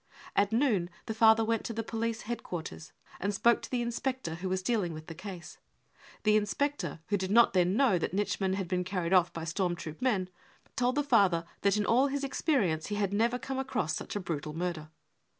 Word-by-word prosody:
At 200 +1 +3
noon 220 -8 +2 0.2
the 220 - -3
father 220 0 +5
went 225 0 0
to 230 - -3
the 225 +1 -3
police 230 +1 -2
headquarters 175 -8 -6 0.3
and? 200 +1 -1
spoke 235 +4 +4
to - - -8
the 245 -2 0
inspector 240 -5 -2
who 180 +3 -4
was 185 0 -1
dealing 205 -8 0
with 155 0 -9
the 165 - -8
case. 185 0 -9 0.6
The 215 - +4
I - - +6
inspector, 280 - -2
who 205 - +2
did 190 -1 -3
not 235 +3 +5
then 180 +2 +3
know 255 -10 +4
that - - -2
Nitschmann 195 -1 0
had 195 -1 -2
j 180 +1 0
been 180 - 0
carried 180 -1 -2
off 180 -2 +5
by 165 - -6
storm 175 +2 -1
troop 155 -2 -8
men, 205 -8 +1 0.5
told 250 0 +1
the 290 - +2
father 200 -11 +3 0.2
that 200 +1 +3
in 210 - +1
all 255 +5 +4
his 280 0 -2
experience 225 - 0
he 205 - -3
had 200 -1 0
never 230 +4 +2
come 265 +1 -4
across 220 - -1
such - - -6
a - - 0
brutal 155 -4 -4
murder. 170 -3 -3
205 Hz, 220 wpm, -30 LUFS, 180-235 Hz, 0.6 s, I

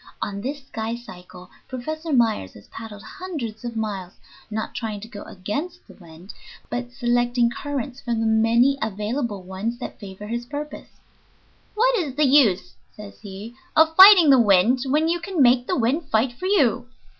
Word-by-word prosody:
On 200 0 -4
this 280 +5 -4
"skycycle" 220 -7 -8 0.2
Professor 310 +6 -5
Myers 225 - +1
has 100 - -14
paddled 215 -3 -10
hundreds 295 - -7
of 240 -1 -5
miles, 200 -4 -4 0.4
not 220 0 -4
trying 215 -3 -4
to 220 - -9
go 210 -3 -10
against 290 - -5
the - - -14
wind, 170 +1 -14 0.4
but 245 0 -4
selecting 240 -1 +1
currents 275 -1 -5
from 235 -2 -2
the 225 - 0
many 230 +5 +3
available 210 0 -3
ones 190 +6 -4
that 245 - -8
favor 200 0 -9
his 235 +2 -4
purpose. 295 +3 -7 0.9
"What 485 +1 +3
is 290 -7 -4
the 300 +1 +3
use," 215 - +3 0.2
says 210 -1 -11
he, 205 +2 -9 0.2
"of 320 0 +4
fighting 375 -5 +9
the 260 -3 +6
wind 210 +4 +4
when 300 +4 +1
you 345 +1 0
can 355 0 -5
make 250 -1 +4
the - - 0
wind 275 +7 0
fight 230 +3 +1
for 365 +10 -5
you? 255 - +2
240 Hz, 170 wpm, -23 LUFS, 210-280 Hz, 0.9 s, fighting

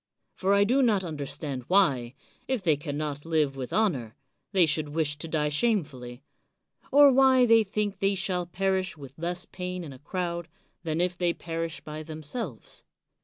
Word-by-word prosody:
For 195 +1 +2
I 200 - +5
do 250 +7 +3
not 215 -7 +3
understand 145 -4 -4
why, 135 -11 +2 0.3
if 260 -6 -1
they 160 -4 +4
can 145 0 -5
not 145 -1 -3
live 155 -4 +1
with 130 -2 -5
honor, 140 - 0 0.4
they 190 -4 +5
should 155 -1 -1
wish 150 -1 -1
to 165 - -5
die 150 -2 0
shamefully; 145 - -1 0.7
or 285 0 +8
why 260 -1 +6
they 230 -1 +6
think 205 -1 -2
they 195 0 +2
shall 180 -2 -1
pt^rish 190 0 -1
with 135 -3 -10
less 175 +2 -3
pain 180 -1 -5
in 145 -4 -8
a 130 - -13
crowd, 170 +2 -3 0.3
than 165 -1 -1
if 180 0 0
they 175 -1 +1
per 165 0 -4
ish 165 0 -7
by 155 0 -7
themselves. 155 - -6
170 Hz, 175 wpm, -27 LUFS, 150-195 Hz, 0.7 s, or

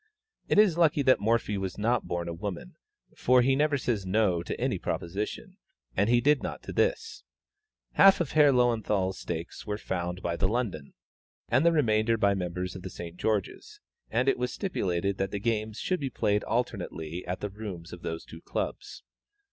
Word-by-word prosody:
It - - +2
is 195 -6 +5
lucky 150 -4 +4
that 130 -1 +5
Morphy 105 -1 +1
was 95 -2 -4
not 115 +4 0
born 85 0 -2
a 85 - -3
woman, 85 - -6 0.4
for 125 0 +4
he 135 +1 +3
never 145 +1 +2
says 120 -6 -1
"no" 95 -2 +2
to 85 - -5
any - - 0
proposition, 95 +5 -4 0.4
and 100 +3 +2
he 120 0 +5
did 145 +2 +3
not - - -5
to - - -7
this. 450 0 0 0.7
Half 195 0 +6
of 170 -5 -1
Herr 150 -2 +6
Löwenthal's 110 -7 +1
stakes 85 +3 -6
were 105 0 -2
found 90 -3 -4
by 85 -1 -1
the 95 - +1
London, 100 - -3 0.5
and 130 +5 +3
the 170 - +5
remainder 115 -7 +2
by 100 -2 +3
members 90 -1 -3
of 95 - -7
the 95 - -6
St. 85 -1 -8
George's; 105 0 -2 0.3
and 125 +4 +1
it 135 - +3
was 125 0 -1
stipulated 100 - -1
that 95 - 0
the 100 - -3
games 110 0 -1
should 185 -1 -1
be 135 - -2
played 105 -3 0
alternately 90 -8 -3
at 90 +1 -3
the 105 - -2
rooms 95 -5 -7
of 90 - -9
those 80 0 -5
two 80 - -11
clubs. - - -5
105 Hz, 190 wpm, -28 LUFS, 90-125 Hz, 0.7 s, Half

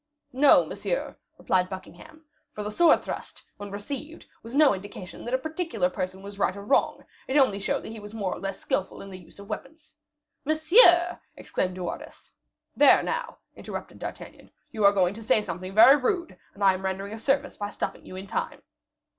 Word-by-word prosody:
"No, 275 +2 +6
monsieur," - - -3 0.2
replied 185 -1 +1
Buckingham; 315 +11 -11 0.3
"for 210 - -5
the 210 - -4
sword 335 +7 +4
thrust, - - -7
when 205 0 -8
received, 275 +10 -7 0.2
was 230 +3 -9
no 295 -4 +6
indication 190 -2 -9
that 240 - -4
a - - +3
particular 315 - -2
person 185 +1 -5
was 200 0 -10
right 190 0 +1
or 200 - -8
wrong; 270 - +1 0.2
it 265 - +1
only 235 -8 +3
showed 195 - -2
that - - -7
he 225 - -8
was 205 0 -10
more 205 -4 -3
or - - -8
less 195 -1 -5
skillful 190 - -3
in 195 - -10
the 185 - -9
use 175 - -18
of 200 - -11
the - - -11
weapon." 270 +4 -6 0.7
"Monsieur!" 345 - +5 0.2
exclaimed 185 -1 -2
De 185 - -5
Wardes. 175 - -8 0.4
"There, - - +6
now," - - -3 0.2
interrupted - - -8
D'Artagnan, - - -9 0.2
"you 215 - -3
are 200 - +8
going 190 -2 +2
to 225 - -10
say 220 0 +3
something 185 0 -6
very 265 +6 +9
rude, 340 +5 -1 0.2
and 200 - -5
I 195 -1 +6
am 185 +1 -6
rendering 195 +2 -3
a 225 - -7
service 275 +4 0
by 205 0 -4
stopping - - -5
you - - -10
in 190 +1 -7
time." - - -4
210 Hz, 200 wpm, -26 LUFS, 190-285 Hz, 0.7 s, very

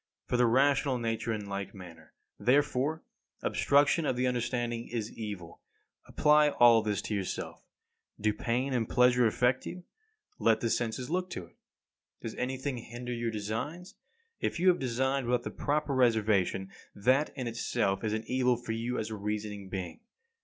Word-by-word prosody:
For - - -1
the 125 -1 +4
rational 135 +2 +3
nature 115 -1 -2
in 105 -2 -3
like 100 0 -5
manner, 90 -4 -12 0.2
therefore, 140 +3 +2 0.4
obstruction 145 +3 +3
of 130 - +1
the 125 +1 0
understanding 120 -1 -1
is 115 -2 -4
evil. 100 -7 -7 0.5
Apply 150 0 +4
all 120 -4 +6
this 105 -3 -2
to - - -3
yourself. 100 -3 -4 0.6
Do 105 0 +1
pain 125 +5 -1
and 115 -3 0
pleasure 125 -1 +4
affect 125 +3 +1
you? 180 0 -7 0.6
Let 110 -1 +3
the 115 -1 -1
senses 120 +4 -2
look 180 +1 -1
to 90 - -6
it. 85 - -24 0.6
Does 115 - -6
anything 130 +1 -3
hinder 120 +2 -6
your 120 -1 -2
designs? 115 - -4 0.5
If - - -2
you 185 +2 +5
have 180 - +3
designed 130 +1 0
without 125 0 +1
the - - -5
proper 150 0 -1
reservations, 105 -6 +2 0.2
that 130 +8 +2
in 130 - -3
itself 115 -3 -1
is 110 -1 0
an 110 0 -2
evil 125 -1 +2
for 120 -1 -6
you 115 +2 -2
as 110 0 -3
a - - -3
reasoning 105 -1 -4
being. 95 - -5
120 Hz, 165 wpm, -30 LUFS, 110-130 Hz, 0.6 s, all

